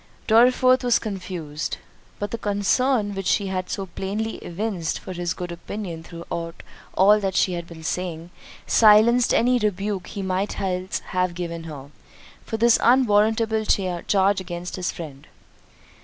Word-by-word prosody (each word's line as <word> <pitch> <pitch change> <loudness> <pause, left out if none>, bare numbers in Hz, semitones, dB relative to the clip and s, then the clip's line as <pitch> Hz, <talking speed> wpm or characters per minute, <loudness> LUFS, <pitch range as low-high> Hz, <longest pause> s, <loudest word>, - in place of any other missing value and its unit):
Dorriforth 255 +3 +5
was 245 -1 +4
confused—but 185 0 -6
the 230 - -3
concern 205 +2 +1
which 195 -1 -4
she 200 - +2
had 185 -1 -3
so 195 - -3
plainly 200 +5 -4
evinced 180 -2 -3
for 185 - -8
his 175 -1 -3
good 175 -1 -5
opinion 170 -1 -6
throughout 170 0 -7 0.3
all 205 +3 +6
that 195 -2 -2
she 185 - +2
had 170 -1 -5
been 165 -1 -11
saying, 170 0 -4 0.3
silenced 225 +3 +5
any 250 +1 +3
rebuke 205 -2 -2
he 200 - -6
might 190 +2 -2
else 185 -1 -2
have 180 -1 0
given 170 -2 -5
her, 145 -3 -9 0.5
for 225 - -4
this 235 +1 +4
unwarrantable 220 -2 +3
charge 195 0 +1
against 175 -1 -6
his 180 -1 -2
friend. 145 -5 -9
190 Hz, 140 wpm, -23 LUFS, 175-215 Hz, 0.5 s, all